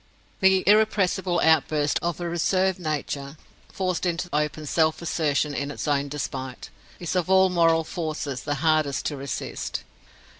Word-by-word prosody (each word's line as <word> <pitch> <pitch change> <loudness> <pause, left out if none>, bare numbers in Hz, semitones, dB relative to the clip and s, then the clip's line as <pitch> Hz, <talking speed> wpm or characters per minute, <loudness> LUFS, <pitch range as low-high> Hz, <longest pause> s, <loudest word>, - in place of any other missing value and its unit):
The 190 -1 +4
irrepressible 195 -4 +3
outburst 155 -2 +3
of 170 0 -2
a 175 - -3
reserved 185 +2 +1
nature, 150 -3 -4 0.3
forced 185 -2 -2
into 175 0 -1
open 150 +1 -1
self 160 +1 +1
assertion 150 -3 0
in 140 0 -3
its 145 - -5
own 145 -1 +1
despite, 130 -3 -5 0.3
is 175 +1 -3
of 180 0 0
all 190 0 +5
moral 165 -2 +3
forces 155 -6 -4
the 145 0 -2
hardest 155 -2 +1
to 150 - -1
resist. 140 0 -4
160 Hz, 145 wpm, -25 LUFS, 145-180 Hz, 0.3 s, all